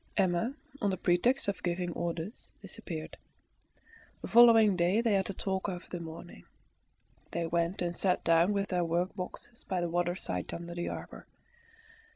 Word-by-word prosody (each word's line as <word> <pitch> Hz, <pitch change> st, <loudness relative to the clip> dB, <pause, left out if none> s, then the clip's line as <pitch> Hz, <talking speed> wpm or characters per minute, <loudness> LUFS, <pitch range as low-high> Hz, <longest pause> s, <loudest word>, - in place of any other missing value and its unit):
Emma, 190 Hz, +6 st, +1 dB, 0.3 s
on 205 Hz, -, +2 dB
the 190 Hz, -, -1 dB
pretext 190 Hz, +10 st, +2 dB
of 200 Hz, -, -2 dB
giving 175 Hz, 0 st, -1 dB
orders, 170 Hz, +5 st, -4 dB
disappeared. -, -, -7 dB, 1.1 s
The -, -, -3 dB
following 225 Hz, -4 st, +7 dB
day 180 Hz, +4 st, +2 dB
they 230 Hz, -2 st, +2 dB
had 195 Hz, 0 st, +1 dB
a -, -, -2 dB
talk 190 Hz, +1 st, -2 dB
over 180 Hz, -1 st, -6 dB
the 175 Hz, -, -3 dB
mourning. 165 Hz, -1 st, -9 dB, 0.8 s
They 170 Hz, 0 st, -2 dB
went 170 Hz, +2 st, 0 dB
and 175 Hz, 0 st, -2 dB
sat 185 Hz, 0 st, +1 dB
down 165 Hz, +3 st, +4 dB
with 200 Hz, -1 st, -1 dB
their 180 Hz, -2 st, +1 dB
workboxes 180 Hz, +7 st, -3 dB
by 185 Hz, -, -1 dB
the 175 Hz, -1 st, -1 dB
waterside 175 Hz, -, -2 dB
under 170 Hz, 0 st, -7 dB
the 175 Hz, 0 st, -3 dB
arbour. -, -, -8 dB
180 Hz, 160 wpm, -31 LUFS, 170-200 Hz, 1.1 s, following